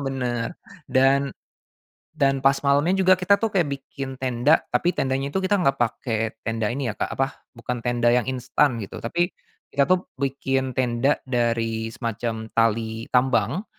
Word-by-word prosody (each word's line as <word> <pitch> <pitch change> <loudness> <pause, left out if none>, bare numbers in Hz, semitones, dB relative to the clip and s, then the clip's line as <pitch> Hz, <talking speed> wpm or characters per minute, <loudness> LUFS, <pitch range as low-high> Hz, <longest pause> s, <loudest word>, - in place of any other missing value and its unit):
Bener 125 +1 -2 0.3
dan 135 +1 +3 0.8
dan 135 -3 +1
pas 135 - +7
malemnya 145 +7 +2
juga 185 -1 +5
kita 200 +2 +3
tuh 225 - +1
kayak 180 -7 +1
bikin 135 -1 -7
tenda 130 +4 +3
tapi 175 +1 +1
tendanya 135 +1 -1
itu 190 - 0
kita 190 +2 +2
enggak 155 -8 +2
pakai 115 -1 -1 0.3
tenda 115 -2 -1
ini 135 +3 -3
ya, - - -3
Kak, - - -3
apa 135 +1 -2 0.2
bukan 120 +1 -4
tenda 120 0 +2
yang 125 +1 +1
instan 125 0 +1
gitu 100 -4 -7
tapi, 175 +9 -1 0.4
kita 140 +2 +2
tuh 185 0 +3 0.2
bikin 135 -1 -1
tenda 125 +2 +2
dari 115 -3 0
semacam 115 -1 -4
tali 115 0 0
tambang, 130 - +1
130 Hz, 155 wpm, -24 LUFS, 115-140 Hz, 0.8 s, pas